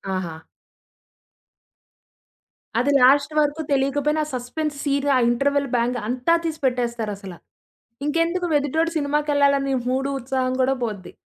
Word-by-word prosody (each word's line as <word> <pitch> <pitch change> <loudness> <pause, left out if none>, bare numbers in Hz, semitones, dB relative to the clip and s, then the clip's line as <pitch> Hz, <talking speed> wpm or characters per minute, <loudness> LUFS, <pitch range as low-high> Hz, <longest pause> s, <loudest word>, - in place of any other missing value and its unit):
ఆహా! 170 -4 -5 2.4
అది 270 +4 +2
లాస్ట్ 280 +4 +5
వరకు 295 +1 +1
తెలియకపోయినా 290 +3 +1
సస్‌పెన్స్ 285 +5 -3
సీన్, 280 0 0
ఆ - - +4
ఇంటర్వల్ 280 +3 +1
బ్యాంగ్ 245 +1 +1
అంతా 255 +7 +2
తీసి 315 -1 -3
పెట్టేస్తారు 240 -4 -1
అసల. 195 -3 -9 0.7
ఇంకెందుకు? 335 +4 0
ఎదుటోడు 320 +4 0
సినిమాకెళ్ళాలని 285 -2 +1 0.2
మూడు, 270 +2 0
ఉత్సాహం 255 0 -1
కూడా 265 +1 +3
పోద్ది. 205 -5 -5
275 Hz, 110 wpm, -22 LUFS, 245-295 Hz, 2.4 s, లాస్ట్